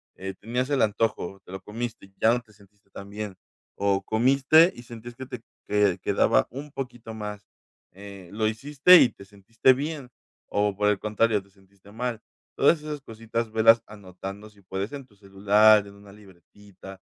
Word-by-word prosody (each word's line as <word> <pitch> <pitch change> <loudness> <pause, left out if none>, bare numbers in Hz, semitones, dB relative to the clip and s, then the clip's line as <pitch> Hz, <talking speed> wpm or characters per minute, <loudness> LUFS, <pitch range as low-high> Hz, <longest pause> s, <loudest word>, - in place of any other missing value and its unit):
eh, 95 0 -6
tenías 125 +4 -2
el 140 -2 +1
antojo, 105 -3 -1
te - - -13
lo 95 0 -7
comiste, 110 -2 -7
ya 115 - +4
no 125 - 0
te 110 -3 -24
sentiste 100 0 -25
tan 100 0 -11
bien, 105 -2 -6 0.4
o 100 -1 +1
comiste, 135 - +4
y 120 - -11
sentías 120 0 -11
que 130 +1 -8
te 125 -2 -8 0.3
que 105 -3 +2
quedaba - - +2
un 140 +4 -8
poquito 120 -4 -7
más, 105 -2 -7 0.5
eh, 100 -2 -12
lo 110 +1 0
hiciste 145 +10 +5
y 125 - +5
te 100 - -15
sentiste 105 +6 +1
bien, 145 -1 -5 0.4
o, 105 0 0
por 105 +1 0
el 105 -2 +1
contrario, 110 0 +1
te 100 - -25
sentiste 95 0 -22
mal. 115 0 -4 0.4
Todas 165 - +4
esas 150 -1 -6
cositas 115 -1 -5
velas 115 +1 +5
anotando 100 +1 -10
si 100 -1 -23
puedes 95 +4 -5
en 140 -2 -7
tu 105 - -26
celular, 105 +2 +4
en 100 - -14
una 100 0 -16
libretita, 95 0 -15
105 Hz, 180 wpm, -25 LUFS, 100-120 Hz, 0.5 s, hiciste